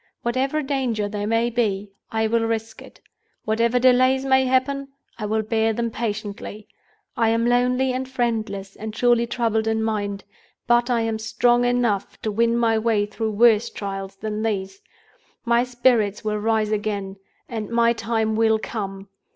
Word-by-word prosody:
Whatever 265 Hz, +5 st, 0 dB
danger 255 Hz, -7 st, -1 dB
there 205 Hz, 0 st, -4 dB
may 230 Hz, +2 st, +1 dB
be, 205 Hz, -4 st, -1 dB, 0.2 s
I 220 Hz, 0 st, 0 dB
will 230 Hz, +1 st, +1 dB
risk 225 Hz, -1 st, -3 dB
it. -, -, -14 dB, 0.5 s
Whatever 230 Hz, +2 st, +2 dB
delays 255 Hz, +1 st, +4 dB
may 265 Hz, 0 st, +4 dB
happen, 270 Hz, +2 st, +1 dB, 0.3 s
I 210 Hz, -, -3 dB
will 220 Hz, +1 st, 0 dB
bear 220 Hz, 0 st, +1 dB
them 235 Hz, +1 st, -2 dB
patiently. 210 Hz, -1 st, -5 dB, 0.5 s
I 225 Hz, -1 st, +2 dB
am 230 Hz, +1 st, +1 dB
lonely 250 Hz, +2 st, +2 dB
and 260 Hz, +1 st, -3 dB
friendless, 220 Hz, -6 st, -2 dB
and 220 Hz, 0 st, -7 dB
surely 240 Hz, -1 st, +3 dB
troubled 225 Hz, -2 st, 0 dB
in 220 Hz, 0 st, 0 dB
mind, 205 Hz, -3 st, -2 dB, 0.4 s
but 240 Hz, 0 st, +3 dB
I 240 Hz, -2 st, +2 dB
am 225 Hz, -1 st, -1 dB
strong 240 Hz, +2 st, +2 dB
enough 245 Hz, -5 st, 0 dB
to 215 Hz, -, -1 dB
win 230 Hz, +2 st, +2 dB
my 225 Hz, -2 st, +2 dB
way 220 Hz, -2 st, +1 dB
through 215 Hz, +1 st, -3 dB
worse 230 Hz, +1 st, +4 dB
trials 195 Hz, -1 st, -6 dB
than 215 Hz, +1 st, -4 dB
these. 195 Hz, -3 st, -3 dB, 0.6 s
My 235 Hz, 0 st, +3 dB
spirits 240 Hz, -4 st, +1 dB
will 210 Hz, -1 st, -1 dB
rise 215 Hz, 0 st, +1 dB
again, 205 Hz, -2 st, -2 dB, 0.3 s
and 220 Hz, -3 st, -5 dB
my 235 Hz, 0 st, +3 dB
time 220 Hz, -1 st, -1 dB
will 220 Hz, 0 st, +3 dB
come. 195 Hz, -3 st, -5 dB
225 Hz, 160 wpm, -23 LUFS, 210-240 Hz, 0.6 s, delays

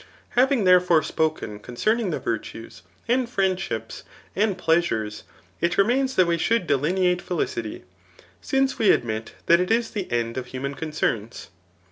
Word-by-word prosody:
Having 260 Hz, -2 st, +2 dB
therefore 180 Hz, -3 st, +5 dB
spoken 155 Hz, -12 st, -2 dB
concerning 215 Hz, -, -1 dB
the 160 Hz, -, -2 dB
virtues^ 115 Hz, 0 st, -5 dB, 0.3 s
and 250 Hz, +1 st, +2 dB
friaidships, 190 Hz, -, -2 dB, 0.3 s
and 205 Hz, -1 st, +1 dB
pleasures, 160 Hz, -13 st, 0 dB, 0.4 s
k 170 Hz, -, +3 dB
remains 260 Hz, +6 st, +2 dB
that 185 Hz, -, +5 dB
we 170 Hz, 0 st, 0 dB
shook! 230 Hz, +1 st, +1 dB
delineate 180 Hz, +5 st, +1 dB
felicity, 115 Hz, -10 st, -3 dB, 0.6 s
since 270 Hz, 0 st, 0 dB
we 215 Hz, -, +4 dB
admit 110 Hz, -1 st, 0 dB
that 170 Hz, 0 st, +5 dB
it 180 Hz, -, 0 dB
is 230 Hz, +1 st, +1 dB
the 205 Hz, -4 st, -3 dB
endof 120 Hz, 0 st, -2 dB
human 130 Hz, +2 st, -5 dB
concerns. 140 Hz, -, -3 dB
175 Hz, 135 wpm, -24 LUFS, -, 0.6 s, therefore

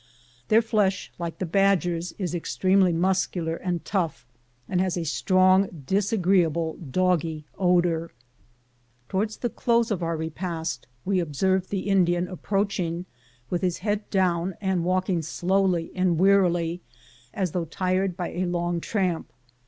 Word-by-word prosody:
Their 225 Hz, +2 st, +5 dB
flesh, 210 Hz, -4 st, 0 dB
like 170 Hz, -1 st, -4 dB
the 185 Hz, -, -2 dB
badger's, 180 Hz, -2 st, +1 dB
is 180 Hz, -5 st, -4 dB
ex 175 Hz, -, -4 dB
tremely 185 Hz, -1 st, +4 dB
muscular 175 Hz, -1 st, 0 dB
and 175 Hz, -1 st, -3 dB
tough, 175 Hz, -7 st, -2 dB, 0.4 s
and 180 Hz, -1 st, +1 dB
has 185 Hz, -2 st, 0 dB
a 170 Hz, -, -2 dB
strong, 185 Hz, 0 st, +3 dB
dis 195 Hz, +6 st, +1 dB
agreeable, 170 Hz, -5 st, +2 dB
doggy 165 Hz, 0 st, 0 dB
odor. 175 Hz, -3 st, +2 dB, 1.0 s
Towards 210 Hz, +3 st, -1 dB
the 240 Hz, -, -2 dB
close 235 Hz, -1 st, +1 dB
of 190 Hz, -4 st, -1 dB
our 165 Hz, -1 st, -1 dB
repast, 160 Hz, -3 st, -4 dB, 0.2 s
we 190 Hz, -1 st, +1 dB
observed 185 Hz, +4 st, 0 dB
the 195 Hz, -2 st, -1 dB
Indian 180 Hz, -2 st, +2 dB
approaching 185 Hz, -2 st, -2 dB, 0.5 s
with 175 Hz, -, 0 dB
his 180 Hz, -2 st, 0 dB
head 205 Hz, 0 st, -1 dB
down, 185 Hz, -2 st, +1 dB
and 190 Hz, -4 st, 0 dB
walking 185 Hz, 0 st, +1 dB
slowly 175 Hz, +1 st, 0 dB
and 185 Hz, -3 st, +1 dB
wearily 175 Hz, -2 st, +3 dB, 0.5 s
as 185 Hz, +1 st, -2 dB
though 175 Hz, 0 st, -2 dB
tired 185 Hz, +2 st, -1 dB
by 180 Hz, -, -3 dB
a 185 Hz, +1 st, -2 dB
long 175 Hz, 0 st, -1 dB
tramp. 185 Hz, -6 st, -1 dB
180 Hz, 140 wpm, -25 LUFS, 170-190 Hz, 1.0 s, Their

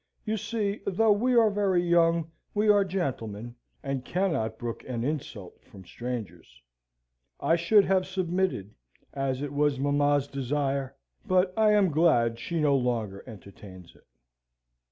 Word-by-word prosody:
"You 215 Hz, 0 st, -1 dB
see, 210 Hz, -1 st, -3 dB
though 215 Hz, +3 st, +3 dB
we 245 Hz, +5 st, +2 dB
are 225 Hz, -3 st, +5 dB
very 195 Hz, -3 st, +1 dB
young, 170 Hz, -1 st, +2 dB, 0.2 s
we 210 Hz, +1 st, +2 dB
are 205 Hz, -1 st, +5 dB
gentlemen, 120 Hz, -, -4 dB, 0.3 s
and 135 Hz, -2 st, -3 dB
cannot 160 Hz, -, -1 dB
brook 120 Hz, -1 st, -6 dB
an 120 Hz, -3 st, -3 dB
insult 130 Hz, -, -5 dB
from 100 Hz, -7 st, -15 dB
strangers. 115 Hz, -, -7 dB, 0.8 s
I 165 Hz, -, +2 dB
should 190 Hz, +4 st, +4 dB
have 185 Hz, -1 st, +1 dB
submitted, 185 Hz, -, -2 dB, 0.4 s
as 135 Hz, 0 st, -2 dB
it 145 Hz, -1 st, -5 dB
was 145 Hz, -1 st, +1 dB
mamma's 145 Hz, 0 st, +1 dB
desire; 140 Hz, 0 st, -2 dB, 0.3 s
but 185 Hz, -1 st, +2 dB
I 215 Hz, -1 st, +4 dB
am 200 Hz, -4 st, +3 dB
glad 120 Hz, -8 st, +2 dB
she 170 Hz, +7 st, -3 dB
no 145 Hz, -2 st, +3 dB
longer 115 Hz, -6 st, -2 dB
entertains 95 Hz, -4 st, -13 dB
it." -, -, -25 dB
145 Hz, 140 wpm, -27 LUFS, 120-190 Hz, 0.8 s, are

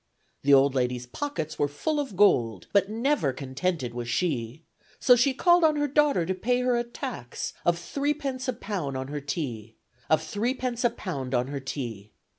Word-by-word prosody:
The 140 Hz, -, +2 dB
old 135 Hz, 0 st, +4 dB
lady's 125 Hz, -1 st, -1 dB
pockets 155 Hz, -, -4 dB
were 145 Hz, -, +3 dB
full 295 Hz, -, -2 dB
of 270 Hz, -9 st, -4 dB
gold, 115 Hz, -, +3 dB
But 200 Hz, -1 st, +4 dB
never 230 Hz, -, +1 dB
contented 135 Hz, 0 st, -2 dB
was 120 Hz, -1 st, -5 dB
she, 130 Hz, -1 st, -1 dB, 0.4 s
So 250 Hz, -, +6 dB
she 245 Hz, +3 st, +3 dB
called 345 Hz, +6 st, +4 dB
on 310 Hz, -1 st, +5 dB
her 290 Hz, 0 st, +1 dB
daughter 285 Hz, -, +3 dB
to 190 Hz, -, 0 dB
pay 245 Hz, +7 st, 0 dB
her 250 Hz, -1 st, +2 dB
a 240 Hz, -, +1 dB
tax 240 Hz, -, -6 dB
Of 175 Hz, 0 st, +3 dB
three 285 Hz, +11 st, -1 dB
pence 270 Hz, -3 st, -4 dB
a 255 Hz, -, +1 dB
pound 180 Hz, -, -4 dB
on 130 Hz, +1 st, -5 dB
her 145 Hz, 0 st, -4 dB
tea, 120 Hz, -, -4 dB, 0.3 s
Of 155 Hz, 0 st, +3 dB
three 215 Hz, +10 st, -1 dB
pence 250 Hz, -2 st, -3 dB
a 240 Hz, -, +5 dB
pound 135 Hz, -, -4 dB
on 125 Hz, +2 st, 0 dB
her 140 Hz, -1 st, -3 dB
tea. 120 Hz, -6 st, -6 dB
170 Hz, 195 wpm, -27 LUFS, -, 0.4 s, So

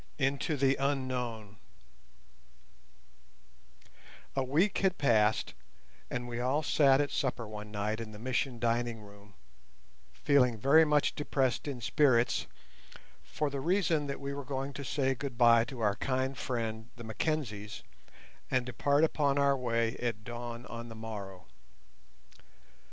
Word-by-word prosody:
INTO 140 Hz, +3 st, 0 dB
THE 135 Hz, 0 st, +3 dB
UNKNOWN 125 Hz, -6 st, -2 dB, 2.8 s
A 135 Hz, -, +1 dB
week 160 Hz, +10 st, +2 dB
had 190 Hz, -1 st, +1 dB
passed, 110 Hz, -5 st, +2 dB, 0.6 s
and 125 Hz, 0 st, -3 dB
we 120 Hz, 0 st, -4 dB
all 130 Hz, +5 st, +1 dB
sat 140 Hz, -3 st, +4 dB
at 145 Hz, -1 st, 0 dB
supper 125 Hz, -5 st, -2 dB
one 105 Hz, 0 st, -8 dB
night 105 Hz, +1 st, -2 dB
in 115 Hz, -2 st, -6 dB
the 105 Hz, -, -10 dB
Mission 125 Hz, +2 st, -1 dB
dining 120 Hz, -1 st, -1 dB
room, 100 Hz, -1 st, -16 dB, 0.8 s
feeling 125 Hz, -5 st, +3 dB
very 140 Hz, +8 st, +6 dB
much 150 Hz, -1 st, +2 dB
depressed 135 Hz, -3 st, -1 dB
in 135 Hz, -4 st, -4 dB
spirits, 120 Hz, -1 st, +2 dB, 0.7 s
for 145 Hz, -, -3 dB
the 140 Hz, -1 st, -3 dB
reason 165 Hz, -3 st, +1 dB
that 140 Hz, -, -4 dB
we 140 Hz, 0 st, -4 dB
were 140 Hz, 0 st, -5 dB
going 135 Hz, +1 st, -4 dB
to 140 Hz, -, -6 dB
say 135 Hz, 0 st, 0 dB
goodbye 120 Hz, -3 st, +3 dB
to 120 Hz, 0 st, -8 dB
our 105 Hz, -2 st, +1 dB
kind 130 Hz, 0 st, -1 dB
friends, 115 Hz, -4 st, -3 dB
the 120 Hz, -, -10 dB
Mackenzies, 110 Hz, -3 st, -3 dB, 0.7 s
and 130 Hz, -1 st, +1 dB
depart 140 Hz, +4 st, +1 dB
upon 145 Hz, -3 st, +2 dB
our 140 Hz, -1 st, +4 dB
way 115 Hz, -3 st, 0 dB
at 115 Hz, -3 st, -3 dB
dawn 120 Hz, +1 st, -6 dB
on 115 Hz, 0 st, -7 dB
the 115 Hz, -, -9 dB
morrow. 100 Hz, -4 st, -7 dB
125 Hz, 135 wpm, -31 LUFS, 115-140 Hz, 2.8 s, very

